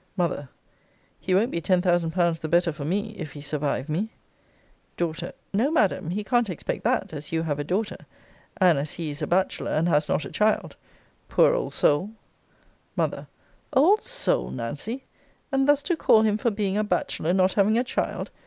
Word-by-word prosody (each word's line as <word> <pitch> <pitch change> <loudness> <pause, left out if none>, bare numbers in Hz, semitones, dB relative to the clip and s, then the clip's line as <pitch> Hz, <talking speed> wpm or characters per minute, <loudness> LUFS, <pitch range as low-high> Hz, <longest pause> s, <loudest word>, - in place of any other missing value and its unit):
M. 155 -6 -1 0.7
He 185 0 0
won't 225 +6 +2
be 170 - -2
ten 185 +2 +3
thousand 175 -2 +2
pounds 170 -1 +1
the 155 - -4
better 170 +1 +3
for 150 -1 -7
me, 205 +8 -2
if 155 -4 -6
he 145 - -9
survive 145 -2 -2
me. 175 +8 -1 0.9
D. 170 -2 0 0.4
No, 230 +8 +2
Madam; 210 - +1
he 205 +4 -2
can't 240 0 +1
expect 175 - -4
that, 225 -7 0
as 150 -1 -7
you 165 0 0
have 145 -3 -2
a - - -1
daughter, 195 +8 -3 0.5
and 180 -6 +4
as 145 +1 -4
he 165 -3 -4
is 145 +2 -8
a 150 - -1
bachelor, 185 +2 0
and 160 +3 +1
has 150 -3 +2
not 155 - 0
a - - -8
child! 215 0 +1 0.5
Poor - - +5
old - - -2
soul! 150 +8 +3 0.9
M. - - -1 0.5
Old 350 +11 +5
soul, - - -1
Nancy! 145 - -5 0.5
And 270 0 +2
thus 290 -1 +4
to 350 - 0
call 220 -8 +4
him 215 -1 +2
for 235 - +2
being 205 -2 -1
a - - +2
bachelor, 180 -4 -1
not 185 0 +3
having 210 +2 +3
a 240 - +2
child! 250 - -3
185 Hz, 190 wpm, -25 LUFS, 160-220 Hz, 0.9 s, Poor